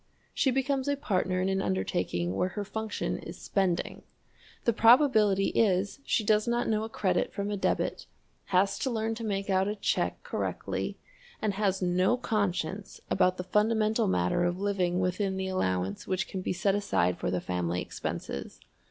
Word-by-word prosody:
She 270 - +2
becomes 270 +1 0
a 285 0 +1
partner 185 -9 0
in 185 - +1
an 195 0 +1
undertaking 90 -2 -1
where 180 - +1
her 205 - 0
function 220 +1 -3
is - - -9
spending. 185 -4 -1 0.6
The 235 - +3
probability 225 -5 +5
is 200 +2 +1
she 225 - +1
does 210 +1 +2
not 240 0 +1
know 215 -1 +1
a 220 - -5
credit 185 -5 0
from 200 +1 -3
a - - 0
debit, 195 - -1 0.4
has 195 +2 +2
to 265 - 0
learn 225 -2 -1
to 230 +1 -6
make 200 -2 -2
out 190 0 +2
a 210 - -1
check 200 - -1
correctly, - - -3 0.4
and 210 -2 0
has 195 -2 0
no 185 +6 +2
conscience 200 -4 -2
about 185 -1 +3
the 180 - -3
fundamental 215 +3 +2
matter 90 - +1
of 175 0 0
living 185 -3 0
within 190 +1 0
the 190 0 -2
allowance 95 - -1
which 190 0 -1
can 190 - -5
be - - -2
set 190 +2 +1
aside 90 - +1
for - - -1
the 90 0 0
family 90 -1 -2
expenses. 70 -5 -5
195 Hz, 175 wpm, -29 LUFS, 180-215 Hz, 0.6 s, probability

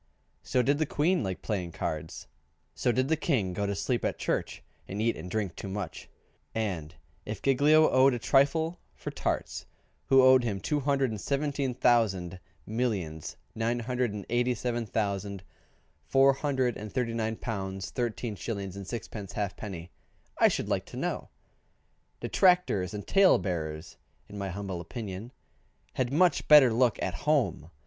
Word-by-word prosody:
So 125 - +1
did 140 +3 +2
the 155 - +1
Queen 170 +7 +1
like 95 -4 -4
playing 90 -6 -3
cards; - - -4 0.5
so 120 - +1
did 130 +2 +1
the 160 - +2
King 125 - 0
go 100 +2 -1
to 100 - -1
sleep 120 +4 -1
at - - -1
church, - - -2 0.2
and 100 - -5
eat 115 +2 +1
and 90 +3 -8
drink 100 -3 -2
too - - -7
much; 95 -3 -5 0.5
and 90 -9 -3 0.3
if 105 -2 -5
Giglio 150 +4 +5
owed 130 0 +4
a - - -1
trifle 160 +7 +2 0.2
for - - -6
tarts, - - -3 0.4
who 135 -1 +6
owed 130 -1 +7
him 105 -5 -2
two 150 +8 -1
hundred 135 -2 +1
and 110 - -5
seventeen 140 -2 -1
thousand 95 -8 +2 0.3
millions, 100 -10 -3 0.2
nine 115 +2 -1
hundred 125 -1 -1
and 105 -1 -6
eighty 120 +1 +1
seven 120 0 -2
thousand, 100 -2 -2 0.6
four 135 0 +5
hundred 130 -3 0
and 105 0 -7
thirty 125 -3 -1
nine 110 -1 -1
pounds 95 -4 -4
thirteen 120 -2 -2
shillings 100 -1 -5
and 100 -2 -7
sixpence 105 -3 -6
halfpenny, 100 -4 -5 0.4
I - - +5
should - - -1
like - - -1
to - - -9
know? - - -3 0.9
Detractors 180 - +2
and 105 - -6
tale 195 -1 +5
bearers 80 -4 -4 0.3
(in 100 0 -8
my 100 -1 -3
humble 95 -1 -4
opinion) 100 +4 -7 0.6
had 130 -1 -1
much 175 +4 +3
better 140 -6 +8
look 120 -1 +2
at 95 - -1
home. 110 - 0
115 Hz, 160 wpm, -29 LUFS, 100-130 Hz, 0.9 s, better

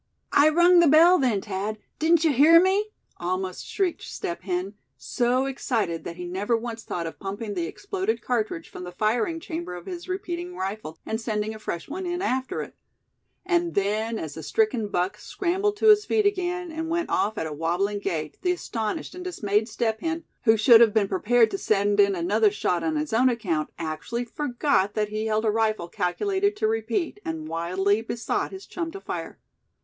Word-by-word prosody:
"I 290 +2 +6
rung 345 +3 +6
the 340 - +6
bell 335 +5 +7
then, 235 -8 +1
Thad; 205 +1 -3 0.2
didn't 325 +1 +4
you 315 -3 +3
hear 310 +6 +7
me?" 385 +4 +2 0.3
almost 185 +1 -3
shrieked 375 -4 -1
Step 170 - -5
Hen, 185 +1 -3 0.2
so 245 - 0
excited 230 -10 -2
that 170 - -5
he 180 0 -6
never 200 +6 0
once 230 0 -6
thought 170 -5 -4
of 165 - -7
pumping 205 +2 -5
the 175 -3 -2
exploded 395 - -2
cartridge 215 -9 -2
from - - -9
the 180 - -7
firing 230 - 0
chamber 325 - -5
of 175 - -9
his 350 0 -7
repeating 360 -2 -4
rifle, 190 -4 -5
and 220 +1 -3
sending 215 -1 -2
a 220 - -10
fresh 170 -5 -5
one 360 +5 -5
in 350 0 -2
after 260 -9 -1
it; - - -11 0.7
and 345 -2 +1
then, 215 +3 0
as 160 -7 -5
the 160 - -7
stricken 425 - +1
buck 180 -1 -1
scrambled 395 +3 -1
to 440 - +4
his 420 0 +7
feet 430 -1 +1
again, 360 -3 -1
and 320 +1 -4
went 340 +1 -1
off 215 +1 +1
at - - -2
a 155 - -4
wobbling 175 +7 -1
gait 160 -7 -4
the 360 - +2
astonished 235 -2 -4
and 360 0 -7
dismayed 215 - 0
Step 220 -1 -1
Hen, 330 0 -2 0.2
who 220 -1 +5
should 230 +2 +7
have 225 -2 +5
been 210 -2 +3
prepared 225 +3 +3
to 195 - -3
send 205 0 +1
in 200 -1 +5
another 205 +5 +3
shot 190 -3 -1
on 315 - 0
his 300 -4 -2
own 250 +3 +4
account, 180 -11 -1
actually 165 +10 -4
forgot 245 -5 0
that 210 -1 0
he 215 +1 -2
held 215 +1 0
a 215 - +3
rifle 215 -5 0
calculated 380 - 0
to 400 - 0
repeat, 225 - -1
and 160 -1 -4
wildly 185 +6 0
besought 230 +1 -2
his 385 0 -9
chum 335 -2 -4
to 390 - -8
fire. - - -6
225 Hz, 195 wpm, -25 LUFS, -, 0.7 s, bell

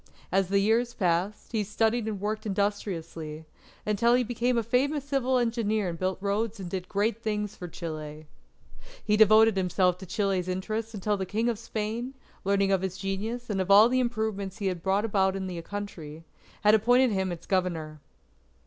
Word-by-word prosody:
As 190 -1 +2
the 200 - +2
years 225 +4 +2
passed, 180 +2 -1
he 220 -3 0
studied 220 +2 0
and 210 -3 -3
worked 215 +2 -3
industriously, 170 -6 -3 0.4
until 220 +3 +3
he 250 - +3
became 245 +1 0
a 230 - +1
famous 270 +5 +1
civil 265 -2 +1
engineer 220 -4 0
and 165 -1 -6
built 185 0 -1
roads 205 +2 -1
and 190 - -5
did 185 0 -5
great 210 +2 0
things 210 -1 -2
for 180 - -7
Chile. 155 -2 -7 0.8
He 210 - +3
devoted 220 0 +6
himself 180 -1 +1
to 190 - -9
Chile's 195 -3 0
interest 215 +5 -3
until 205 +1 0
the 190 -1 -3
King 225 +5 0
of 225 -3 -2
Spain, 230 +3 -4 0.3
learning 195 0 +2
of 190 -2 +2
his 190 -1 -3
genius 215 +5 -3
and 195 -3 -1
of 185 - -3
all 210 +4 +8
the 255 +1 +2
improvements 220 -5 -2
he 205 - -4
had 180 -3 -1
brought 195 +4 +1
about 195 -3 +1
in 190 -1 -3
the 180 -2 -5
country, 165 -5 -7 0.4
appointed 240 +4 +5
him 190 -2 0
its 175 - -7
Governor. 165 -5 -1
205 Hz, 180 wpm, -28 LUFS, 185-225 Hz, 0.8 s, all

